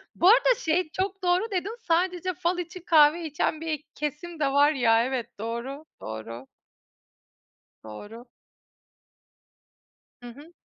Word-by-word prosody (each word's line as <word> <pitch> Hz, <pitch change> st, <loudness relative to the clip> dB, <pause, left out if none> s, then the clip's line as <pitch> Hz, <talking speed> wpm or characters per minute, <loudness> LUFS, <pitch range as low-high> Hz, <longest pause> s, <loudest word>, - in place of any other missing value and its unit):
Bu 350 Hz, -, +3 dB
arada, -, -, +5 dB
şey, 325 Hz, +1 st, 0 dB
çok 385 Hz, +1 st, -3 dB
doğru 365 Hz, +5 st, +1 dB
dedin. 395 Hz, +4 st, -2 dB
Sadece 360 Hz, +2 st, +1 dB
fal 350 Hz, +2 st, -1 dB
için 355 Hz, +1 st, -7 dB
kahve 315 Hz, +1 st, +5 dB
içen 310 Hz, +1 st, -1 dB
bir 310 Hz, -2 st, -3 dB
kesim 305 Hz, +3 st, -5 dB
de 290 Hz, -, +2 dB
var 285 Hz, +2 st, +5 dB
ya. 230 Hz, -5 st, +3 dB
Evet, 255 Hz, -3 st, -2 dB
doğru, 235 Hz, +7 st, -5 dB, 0.2 s
doğru. 115 Hz, +3 st, -7 dB, 1.4 s
Doğru. 205 Hz, -, -10 dB, 2.0 s
Hı 245 Hz, -, -10 dB
hı. 290 Hz, +7 st, -14 dB
310 Hz, 125 wpm, -26 LUFS, 245-355 Hz, 2.0 s, arada